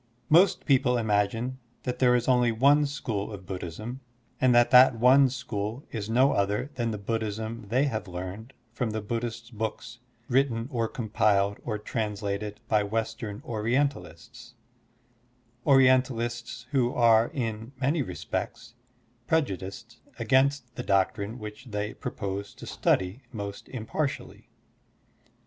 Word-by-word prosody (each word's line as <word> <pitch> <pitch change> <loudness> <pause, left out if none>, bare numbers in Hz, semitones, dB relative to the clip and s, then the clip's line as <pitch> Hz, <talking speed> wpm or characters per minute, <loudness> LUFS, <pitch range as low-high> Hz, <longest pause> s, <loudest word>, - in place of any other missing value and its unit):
Most 175 +5 +5
people 130 -3 +3
imagine 115 +3 0 0.2
that 125 - -3
there 125 -1 +5
is 120 -1 0
only 125 -2 +4
one 140 +6 +4
school 115 -8 -3
of 100 -3 -9
Buddhism 95 +8 -6 0.4
and 130 -1 +4
that 120 0 +5
that 125 0 +8
one 130 +4 +6
school 120 -1 -4
is 110 -2 -4
no 130 +5 +4
other 105 +8 0
than 120 -4 -1
the 110 - -3
Buddhism 110 +1 -3
they 125 +5 +3
have 110 -7 -2
learned 95 +7 -7 0.2
from 120 -1 -1
the 110 0 -3
Buddhist 115 +1 -4
books 115 +2 -4 0.3
written 125 -3 +1
or 115 -3 0
compiled 105 -3 +1
or 110 -3 -2
translated 105 -1 -3
by 110 -2 +3
Western 110 0 -3
Orientalists 120 +2 -2 0.6
— 120 0 -38
Orientalists 125 -3 +2
who 125 -4 +2
are 115 -1 +5
in 115 -2 -4
many 145 +4 +1
respects 115 -2 -5 0.5
prejudiced 115 - -2 0.2
against 130 +1 +2
the - - -5
doctrine 100 +3 0
which 105 +2 -9
they 105 -2 -3
propose 100 0 -5
to - - -10
study 95 +7 0
most 100 -3 -7
impartially. 130 +4 -4
115 Hz, 130 wpm, -27 LUFS, 105-125 Hz, 0.6 s, that